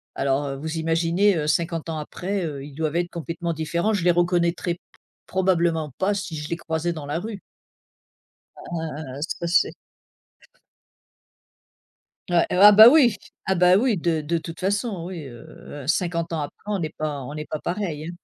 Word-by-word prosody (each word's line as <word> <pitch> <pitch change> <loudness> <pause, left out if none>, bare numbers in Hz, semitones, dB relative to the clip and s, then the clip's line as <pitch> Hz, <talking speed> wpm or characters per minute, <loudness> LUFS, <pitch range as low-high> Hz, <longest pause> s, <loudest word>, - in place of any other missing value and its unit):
alors, 135 +1 0
heu, 135 - -3
vous 160 +3 -4
imaginez, 165 +5 +2
heu, 150 -2 -1
50 165 +1 -1
ans 160 - -3
après, 180 +5 -3
heu, 145 -4 -5
ils 145 - -11
doivent 155 +1 -2
être 175 0 0
complètement 170 0 -4
différents, 170 +6 -1
je 200 -5 -1
les 175 - +6
reconnaîtrais 175 0 +1
p - - -26 0.5
probablement 170 -5 +1
pas 200 +2 +1
si 195 -5 -4
je 150 0 -5
les - - -1
croisais 165 0 -2
dans 155 -3 -7
la 145 +3 -2
rue. 210 +1 -6 1.2
Heu, 155 -5 -6
ça 170 +1 -3
c'est 175 - +3 2.6
Ouais. 175 -1 +3
Heu, - - +1
ah, 210 0 +11
bah, 220 +3 +11
oui. 270 -6 +5 0.3
Ah, 190 - +2
bah 180 0 +5
,oui, 230 +1 +2
de 165 -2 0
de 165 +3 -1
toute 165 +2 -8
façon, 200 -1 -1
oui. 170 -6 -7
Heu, 130 +3 -11
50 170 +1 0
ans 160 - -1
après 145 - -8
on 205 -3 -1
est 155 - -4
pas 150 -2 -3
on 145 - -7
est 150 0 -5
pas 155 - -3
pareil. 170 -4 -3
170 Hz, 180 wpm, -24 LUFS, 155-180 Hz, 2.6 s, ah